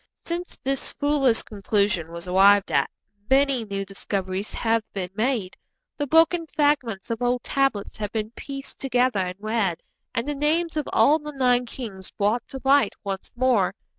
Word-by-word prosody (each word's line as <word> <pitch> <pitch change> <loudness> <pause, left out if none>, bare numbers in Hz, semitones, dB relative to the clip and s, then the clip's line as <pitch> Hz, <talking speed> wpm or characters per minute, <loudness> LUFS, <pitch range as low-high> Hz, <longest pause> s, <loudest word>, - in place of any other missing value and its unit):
Since 345 +1 -4
this 270 0 -1
foolish 285 -5 +2
conclusion 200 -5 0
was 170 +1 -7
arrived 195 +2 +5
at 140 - +2 0.4
many 270 -3 +3
new 195 -1 -3
discoveries 195 0 -4
have 225 0 +1
been 185 -2 -4
made, 220 -3 -1 0.4
the 290 - -2
broken 325 +3 +4
fragments 280 -11 0
of 230 - -3
old 245 0 +1
tablets 270 -7 0
have 210 -1 -4
been 220 -1 -3
pieced 275 +2 -8
together 250 -4 +1
and 180 -1 -2
read, 215 -5 -1 0.3
and 230 +4 -1
the 295 - -1
names 315 +4 0
of 300 -2 -2
all 305 +3 +5
the 300 0 -7
nine 250 -2 +2
kings 205 -7 -7
brought 210 +4 0
to 270 - -7
light 275 -5 +4
once 195 -2 -5
more. 240 -7 +2
235 Hz, 165 wpm, -24 LUFS, 200-275 Hz, 0.4 s, arrived